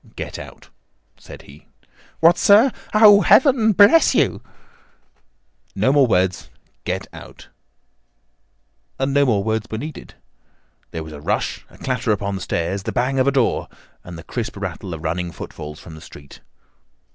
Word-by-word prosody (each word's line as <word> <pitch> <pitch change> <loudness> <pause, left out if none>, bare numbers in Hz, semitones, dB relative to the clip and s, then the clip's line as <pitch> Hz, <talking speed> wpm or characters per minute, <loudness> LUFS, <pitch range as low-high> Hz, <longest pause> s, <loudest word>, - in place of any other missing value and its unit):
"Get - - -7
out!" - - -13 0.5
said - - -14
he. 70 +2 -17 0.5
"What, 165 +1 +6
sir! 220 +6 +5 0.2
Oh, 210 -1 +7
Heaven 250 -4 +4
bless 205 - +5
you!" - - +1 1.3
"No 130 - +1
more 140 -3 +4
words. 90 -4 0 0.4
Get - - -3
out!" - - -13 1.5
And 135 +1 -2
no 140 0 +3
more 105 -5 +1
words 110 +1 -2
were 110 - -5
needed. 150 +5 -9 0.7
There 80 - -6
was 80 0 -11
a 75 - -10
rush, - - -3
a - - -19
clatter 125 -3 -2
upon 100 -1 -2
the 95 - -5
stairs, 90 +3 -3
the - - -5
bang 130 +2 -1
of 130 - +2
a - - +4
door, 130 -4 0 0.4
and 85 -1 -10
the 80 - -11
crisp 115 +2 -5
rattle 95 -2 -6
of 80 - -11
running 85 +2 -3
footfalls 75 -2 -9
from 85 - -12
the 80 - -12
street. 70 -1 -14
110 Hz, 155 wpm, -20 LUFS, 85-140 Hz, 1.5 s, Oh